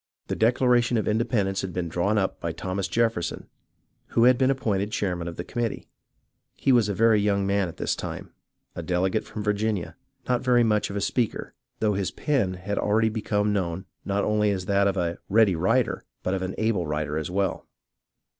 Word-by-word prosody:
The - - -1
Declaration 120 +1 +3
of 110 - -1
Independence 105 -4 +1
had 95 -2 -5
been 90 -2 -2
drawn 90 +6 0
up 95 -2 0
by 85 -1 -3
Thomas 95 +3 -3
Jefferson, 115 -7 -1 0.6
who 115 - +2
had 125 +1 +7
been 130 +1 +2
appointed 105 -6 0
chairman 90 -5 -2
of 85 - -5
the 85 - -5
committee. 120 +3 -3 0.8
Lie 135 - +6
was 120 -5 +4
a 100 - -1
very 110 0 +4
young 100 -1 +1
man 100 -1 +1
at 85 - -9
this - - -1
time, - - -6 0.4
a - - -4
delegate 95 +3 0
from 105 - -6
Virginia, 105 -3 -1 0.3
not 125 -1 +1
very 125 -2 +4
much 105 -2 +1
of 100 - -6
a 100 - -1
speaker, 120 0 -1 0.3
though 105 -1 +2
his 95 -1 -1
pen 120 -12 0
had 100 +3 -3
already 110 +2 +2
become 105 -1 0
known 95 -2 -2 0.2
not 100 0 0
only 105 0 +2
as 95 -2 -2
that 100 +1 +3
of 100 0 0
a 85 -1 -1
"ready 105 -3 +4
writer" 80 - +1 0.2
but 90 - 0
of 95 - -1
an 95 0 -3
able 110 -7 0
writer 75 0 -2
as 80 - -4
well. 95 +1 -1
100 Hz, 195 wpm, -25 LUFS, 95-110 Hz, 0.8 s, had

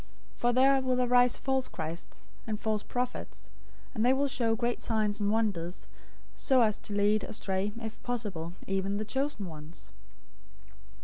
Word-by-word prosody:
024:024 - - -22
For 240 0 +3
there 270 +2 +5
will 255 -1 +1
arise 245 0 +4
false 265 -1 0
christs, 160 - -6 0.2
and 215 -1 -2
false 215 -2 0
prophets, 250 +2 -4 0.4
and 215 - 0
they 250 +2 +5
will 280 +1 +2
show 235 -4 +1
great 240 +1 -1
signs 215 -2 +1
and 205 -1 +1
wonders, 200 -6 -1 0.5
so 265 -3 +3
as 215 -2 +2
to 205 - -6
lead 205 +1 +3
astray, 195 0 -2
if 220 -1 -7
possible, 200 -9 -3
even 195 +1 -1
the 215 - -2
chosen 265 -2 -1
ones. 155 -1 -9
215 Hz, 160 wpm, -30 LUFS, 195-245 Hz, 0.5 s, there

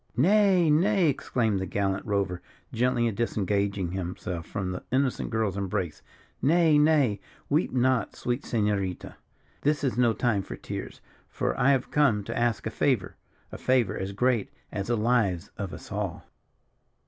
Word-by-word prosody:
"Nay, 185 - +4
nay!" 180 +2 +3
exclaimed 115 -6 0
the 95 - -3
gallant 95 +1 -1
rover, 100 -3 -1 0.3
gently 120 -1 +1
disengaging 100 -4 -1
himself 90 -2 -4
from 95 -2 -3
the 90 - -5
innocent 130 0 0
girl's 110 -4 -1
embrace; 90 -4 -3 0.4
"nay, 155 +1 +4
nay! 145 -9 +3 0.3
weep 150 +4 +2
not, 130 -3 +1
sweet 120 +2 -2
Senorita, 105 -5 -2 0.4
this 150 0 +1
is 125 -3 0
no 120 -2 +4
time 110 -4 +1
for - - -7
tears, - - -7 0.3
for - - -2
I 130 - +3
have 135 -3 +1
come 130 -9 +3
to - - -5
ask 120 -2 0
a - - -2
favour 125 -10 0 0.4
a - - -8
favour 125 -6 +2
as 95 +1 -4
great 115 +1 +1 0.2
as 100 -1 -3
the 120 0 +1
lives 110 -6 +1
of 100 -3 -3
us - - -10
all." - - -4
115 Hz, 155 wpm, -27 LUFS, 100-135 Hz, 0.4 s, Nay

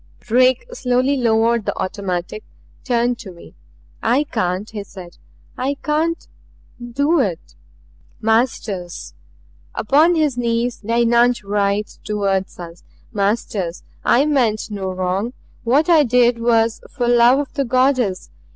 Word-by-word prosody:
Drake 255 - +2
slowly 255 - +1
lowered 230 -2 +1
the - - -2
automatic; 185 +1 -4 0.4
turned 240 -1 0
to 190 - -9
me. 170 - -15 0.5
"I 250 +6 +2
can't," 195 -7 -2
he 210 -2 -5
said. 185 -3 -12 0.4
"I 270 +3 -1
can't 320 +3 -1 0.5
do 285 +7 +1
it 170 - -2 0.4
" 75 +1 -32
"Masters!" 210 -6 -2 0.6
Upon 305 +9 +3
his 295 -6 0
knees 235 0 -1
the 230 +2 -1
eunuch 235 0 +3
writhed 200 +1 -1
toward 200 -2 0
us. 170 -1 -10 0.3
"Masters 200 -4 -2 0.2
I 265 +4 +3
meant 235 -7 0
no 195 -2 -4
wrong. 185 +5 -2 0.3
What 275 +8 +2
I 335 -3 +6
did 245 -2 +3
was 230 -1 +1
for 245 - -2
love 240 +2 +5
of 285 -1 -3
the 280 - 0
Goddess. 255 -6 +1
235 Hz, 130 wpm, -19 LUFS, 200-255 Hz, 0.6 s, I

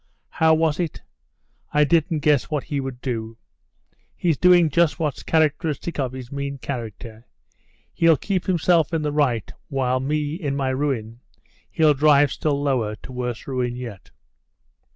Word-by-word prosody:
How 160 0 +3
was 160 -1 +1
it 170 -3 -2 0.7
I 150 0 +4
didn't 160 +1 +1
guess 145 -3 +3
what 150 -3 -1
he 145 -2 -3
would 135 -2 -6
do? 115 -3 -4 0.8
He's 170 -3 +1
doing 175 0 +5
just 170 +1 +2
what's 150 -4 -2
characteristic 160 0 0
of 130 -2 -1
his 130 0 -8
mean 140 0 -4
character. 115 -3 -7 0.7
He'll 165 -2 +4
keep 190 +4 -2
himself 170 -2 +2
in 155 - -1
the 150 - -1
right, 130 -9 0
while 130 -3 0
me, 145 +2 -1
in 150 -5 -3
my 135 -1 -1
ruin, 130 -4 -2 0.5
he'll 155 -2 +3
drive 145 0 +4
still 145 -2 -1
lower 125 -7 0
to 120 - -12
worse 125 -3 -4
ruin 125 -2 -2
yet...." 115 -6 -8
140 Hz, 150 wpm, -23 LUFS, 125-155 Hz, 0.8 s, doing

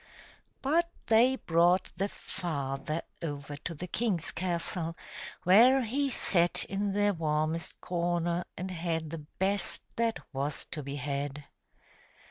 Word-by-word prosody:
But 335 +5 +3 0.2
they 240 +3 +5
brought 175 -2 +3
the 195 +3 -1
father 155 -4 -3 0.2
over 145 -3 -4
to 165 +3 -5
the 170 - -5
king's 185 -3 0
castle, 170 -1 -2 0.5
where 245 +8 +7
he 275 +5 0
sat 175 -8 +3
in 200 0 -1
the 205 0 +3
warmest 155 0 -1
corner 175 0 0
and 185 +2 -4
had 165 -3 -2
the 165 - -4
best 190 +5 0
that 230 -1 +1 0.2
was 140 +2 -2
to 150 - -3
be 140 0 -5
had. 145 0 -3
170 Hz, 125 wpm, -30 LUFS, 155-200 Hz, 0.5 s, where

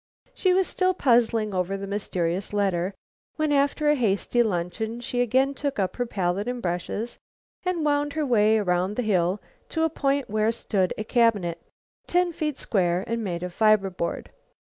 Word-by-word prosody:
She 375 - +2
was 375 +1 +3
still 370 0 +1
puzzling 230 - +2
over 185 +1 -1
the 195 - -5
mysterious 190 -2 -2
letter 195 -2 0 0.4
when, 310 -1 0
after 285 +2 +2
a 295 - +6
hasty 235 -1 +1
luncheon, 220 +3 -2
she 245 0 -2
again 260 +3 +2
took 280 0 -3
up 190 -2 -1
her 245 -1 -1
palette 195 0 -1
and 245 0 -2
brushes 185 +4 -3 0.4
and 360 -4 -1
wound 290 0 +1
her 310 -1 -1
way 220 -4 +4
around 185 -1 0
the 250 - -1
hill 185 -2 +1 0.3
to 320 - 0
a 320 - +2
point 280 -2 0
where 215 +1 +1
stood 200 -5 -1
a 215 - -2
cabinet, 215 -7 +1 0.5
ten 355 0 +2
feet 300 -3 -2
square 180 -3 0
and 230 0 -2
made 175 -3 -3
of 180 -1 -5
fiber 215 -2 +3
board. 170 -1 -4
220 Hz, 175 wpm, -25 LUFS, 190-275 Hz, 0.5 s, a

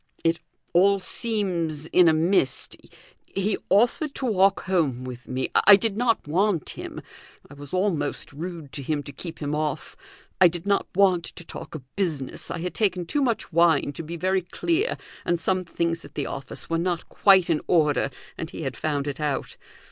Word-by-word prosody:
"It 165 0 +2 0.3
all 195 +3 +5
seems 180 -8 -1
in 180 +2 +5
a 160 - +6
mist. 160 -4 +1 0.5
He 195 +1 -1
offered 245 +8 +2
to 265 - -2
walk 195 -4 +3
home 155 -10 0
with 125 -1 -8
me; 130 +1 -2
I 205 - +8
did 210 0 -1
not 230 -6 +1
want 180 +1 +1
him. - - -7 0.5
I - - -13
was 145 0 -11
almost 185 -6 -1
rude 165 -1 -7
to 140 - -4
him 145 +1 -2
to 140 - -8
keep 160 +4 -8
him 145 -1 -3
off. 150 0 -2 0.5
I 180 - +10
did 175 +1 -4
not 200 0 +1
want 185 -3 +4
to - - -7
talk - - -8
of 150 - -7
business; 155 -9 -2
I - - -3
had 180 +1 -3
taken 185 -5 0
too 285 - 0
much 235 -9 -1
wine 170 -3 +3
to - - -5
be 165 +2 -6
very 185 +2 +1
clear 340 - -1 0.3
and 175 0 0
some 185 +2 0
things 170 0 -2
at - - -14
the 145 - -2
office 135 - -5
were 165 0 0
not 175 -1 -1
quite 190 -3 +5
in 160 -3 +1
order, 150 -5 +3 0.3
and 160 - -4
he 165 - -7
had 135 -2 -3
found 145 -2 -2
it 145 - -4
out. 145 -3 -2
170 Hz, 190 wpm, -25 LUFS, 150-195 Hz, 0.5 s, I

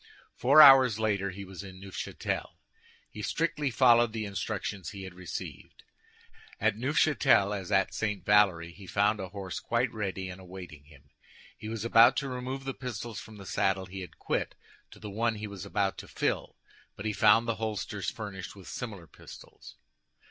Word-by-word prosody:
Four 140 +5 +7
hours 130 -5 +8
later 100 -3 0
he 100 +1 -8
was 95 0 -9
in 95 -1 -11
Neufchâtel. 95 -1 -4 0.6
He 105 - -8
strictly 150 +4 -1
followed 120 -2 +4
the 110 -2 -3
instructions 100 -1 -4
he 100 -3 -8
had 95 -1 -8
received. 90 -1 -8 0.8
At - - +2
Neufchâtel, 130 -5 +3
as 95 -1 -6
at 95 -1 +2
St. 105 -2 -2
Valery, 95 -5 +3
he 95 +2 -13
found 105 +3 +2
a 95 -1 -5
horse 95 -1 -6
quite 120 0 0
ready 95 -3 -3
and 95 0 -8
awaiting 90 -5 -11
him. 70 -1 -20 0.4
He 110 - -8
was 115 0 -4
about 115 0 +6
to 140 - -1
remove 130 +2 -5
the 135 0 -4
pistols 120 -3 -6
from 110 +1 -11
the 100 - -11
saddle 95 +1 0
he 95 +1 -8
had 90 - -10
quit - - -2 0.3
to - - -14
the 105 -2 -8
one 115 +2 0
he 105 0 -6
was 100 -2 -8
about 100 -1 -1
to - - -9
fill, - - -2 0.4
but 100 - -8
he 105 - 0
found 110 +3 +5
the 115 - -1
holsters 105 -2 -3
furnished 100 -4 -7
with 95 -2 -13
similar 105 -8 -6
pistols. - - -14
105 Hz, 175 wpm, -29 LUFS, 95-115 Hz, 0.8 s, hours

